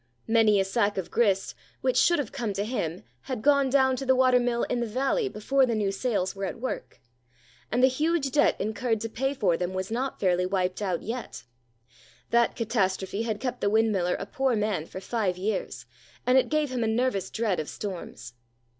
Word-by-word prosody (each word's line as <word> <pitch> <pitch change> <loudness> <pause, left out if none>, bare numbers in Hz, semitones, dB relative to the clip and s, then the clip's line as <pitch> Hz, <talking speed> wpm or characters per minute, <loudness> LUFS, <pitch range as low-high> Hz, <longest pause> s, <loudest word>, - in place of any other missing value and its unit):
Many 220 -2 +4
a 195 - +2
sack 205 +1 0
of 190 - -4
grist, 200 -5 +1 0.3
which - - +1
should 345 - +4
have 275 -7 -3
come 225 -4 -3
to 200 +1 -2
him 180 -8 -3 0.2
had 255 -5 -5
gone 280 -2 +4
down 265 -1 +3
to 270 - -4
the 260 0 +3
watermill 250 -2 +3
in 245 - -1
the 235 - -1
valley 270 - 0
before 270 - +1
the 235 - 0
new 205 -2 0
sails 195 -3 -1
were 195 0 -3
at 195 - -5
work; 255 +2 -5 0.7
and 245 +2 +2
the - - +8
huge 295 +1 0
debt 295 +1 +3
incurred 220 +2 -1
to 225 - -3
pay 270 +5 -1
for 190 -9 +2
them 180 +1 -3
was 190 +2 -3
not 260 +4 -2
fairly 180 -1 +2
wiped 185 0 -1
out 185 -4 -1
yet. 230 - -6 0.9
That 235 0 +3
catastrophe 200 -3 -1
had 220 -2 -2
kept 250 -1 -4
the 200 - +2
windmiller 210 -5 +2
a - - -5
poor 265 +4 0
man 210 -7 -1
for - - -7
five 190 -2 -1
years, 195 +1 -3 0.4
and 250 - +3
it 260 - +4
gave 305 -3 0
him 245 -2 -1
a - - 0
nervous 225 -3 0
dread 220 -5 -1
of 155 - -4
storms. 170 - -7
225 Hz, 200 wpm, -27 LUFS, 195-255 Hz, 0.9 s, the